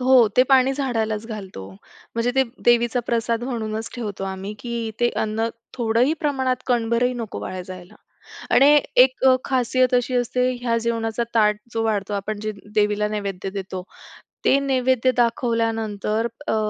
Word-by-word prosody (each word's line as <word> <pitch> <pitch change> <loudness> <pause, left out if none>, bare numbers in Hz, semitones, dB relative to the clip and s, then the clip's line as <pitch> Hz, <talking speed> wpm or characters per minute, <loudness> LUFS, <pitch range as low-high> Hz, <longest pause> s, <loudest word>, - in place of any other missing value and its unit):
हो, 255 -2 +6
ते 255 - +7
पाणी 265 0 +5
झाडालाच 225 -5 -2
घालतो. 195 - -7 0.5
म्हणजे 230 +1 +1
ते 265 - +4 0.2
देवीचा 240 0 +3
प्रसाद 230 0 0
म्हणूनच 225 -3 -3
ठेवतो 205 -5 -5
आम्ही 190 +1 -5
की 235 -2 -4
ते 240 - +4
अन्न 220 +1 -1 0.3
थोडंही 240 +4 +2
प्रमाणात 265 -4 0
कणभरही 240 0 +1
नको 230 -3 -5
वाया 185 -1 -5
जायला 180 -1 -11 0.6
आणि 295 +2 +7 0.2
एक 255 0 +1
अ, 260 -1 +7
खासियत 255 -1 +1
अशी 250 +1 +1
असते 250 +1 +1
ह्या 230 -1 +1
जेवणाचा 230 0 -1
ताट 210 -2 +4 0.2
जो 225 0 -1
वाढतो 205 -2 -1
आपण 205 +1 -3
जे 215 - -2 0.2
देवीला 210 0 +2
नैवेद्य 200 -3 -4
देतो, 190 -1 -5 0.6
ते 275 - +5
नैवेद्य 255 -1 +2
दाखवल्यानंतर 225 -2 0 0.3
अ, 220 - +2
230 Hz, 145 wpm, -22 LUFS, 215-250 Hz, 0.6 s, ते